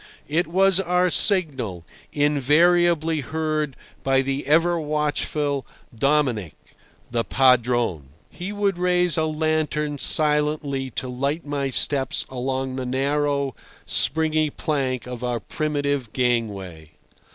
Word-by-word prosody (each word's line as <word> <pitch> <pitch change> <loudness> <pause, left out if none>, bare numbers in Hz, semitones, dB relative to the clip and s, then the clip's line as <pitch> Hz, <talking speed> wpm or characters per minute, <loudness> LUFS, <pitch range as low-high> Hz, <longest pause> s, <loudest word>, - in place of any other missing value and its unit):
It 160 +3 +1
was 190 +2 +3
our 180 -1 +1
signal, 140 - +2 0.3
invariably 160 +3 +3
heard 155 +1 -2 0.3
by 135 0 +2
the 135 +1 -3
ever 170 +3 +3
watchful 150 -2 -1 0.3
Dominic, 130 - +1 0.6
the 120 -1 0
padrone. 120 - +2 0.2
He 185 +3 -6
would 200 -3 -1
raise 180 -2 +2
a 160 -1 +1
lantern 155 -1 -1
silently 150 -3 +1
to 130 - -4
light 140 +6 -2
my 140 -2 -2
steps 135 +1 0
along 130 +1 -3
the 130 - -3
narrow, 140 +1 0 0.3
springy 155 0 +1
plank 135 -5 -2
of 125 -1 -7
our 120 -1 -1
primitive 145 -5 -2
gangway. 100 - -2
145 Hz, 110 wpm, -23 LUFS, 130-155 Hz, 0.6 s, was